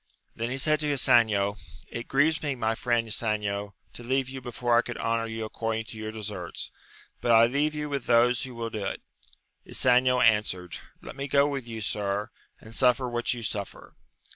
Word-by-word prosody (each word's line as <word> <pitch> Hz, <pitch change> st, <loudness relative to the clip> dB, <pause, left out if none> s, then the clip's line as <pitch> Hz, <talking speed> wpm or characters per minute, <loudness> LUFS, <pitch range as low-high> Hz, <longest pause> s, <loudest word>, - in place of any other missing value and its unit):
Then 115 Hz, +1 st, -3 dB
he 130 Hz, -, -3 dB
said 155 Hz, +2 st, +3 dB
to 150 Hz, -1 st, 0 dB
Ysanjo, 110 Hz, -7 st, +4 dB, 0.3 s
It 115 Hz, +1 st, -6 dB
grieves 155 Hz, +4 st, +2 dB
me, 145 Hz, -3 st, -2 dB
my 115 Hz, -2 st, 0 dB
Mend 120 Hz, -2 st, +2 dB
Ysanjo, 105 Hz, -2 st, -1 dB, 0.2 s
to 120 Hz, -, -9 dB
leave 130 Hz, +1 st, 0 dB
you 130 Hz, 0 st, -7 dB
before 120 Hz, -1 st, 0 dB
I 120 Hz, -, +6 dB
could 120 Hz, -1 st, -7 dB
honour 115 Hz, 0 st, -1 dB
you 110 Hz, 0 st, -4 dB
according 115 Hz, +1 st, -3 dB
to 110 Hz, -, -10 dB
your 110 Hz, 0 st, -4 dB
deserts; 105 Hz, -5 st, -5 dB, 0.5 s
but 120 Hz, -, -1 dB
I 115 Hz, 0 st, +7 dB
leave 145 Hz, +5 st, 0 dB
you 150 Hz, 0 st, -3 dB
with 140 Hz, -3 st, -4 dB
those 120 Hz, 0 st, +4 dB
who 130 Hz, -2 st, -6 dB
will 115 Hz, -1 st, -4 dB
do 110 Hz, -2 st, -4 dB
it. 95 Hz, -, -4 dB, 0.6 s
Ysanjo 125 Hz, 0 st, +3 dB
answered, 105 Hz, -6 st, +2 dB, 0.3 s
let -, -, -9 dB
me 140 Hz, 0 st, -4 dB
go 140 Hz, +1 st, +4 dB
with 135 Hz, -4 st, -4 dB
you, 115 Hz, -1 st, -6 dB
sir, 105 Hz, +1 st, -2 dB, 0.3 s
and 110 Hz, -, -13 dB
suffer 125 Hz, +1 st, +3 dB
what 120 Hz, 0 st, -1 dB
you 120 Hz, -, -7 dB
suffer. 100 Hz, -2 st, -5 dB
115 Hz, 190 wpm, -27 LUFS, 110-130 Hz, 0.6 s, I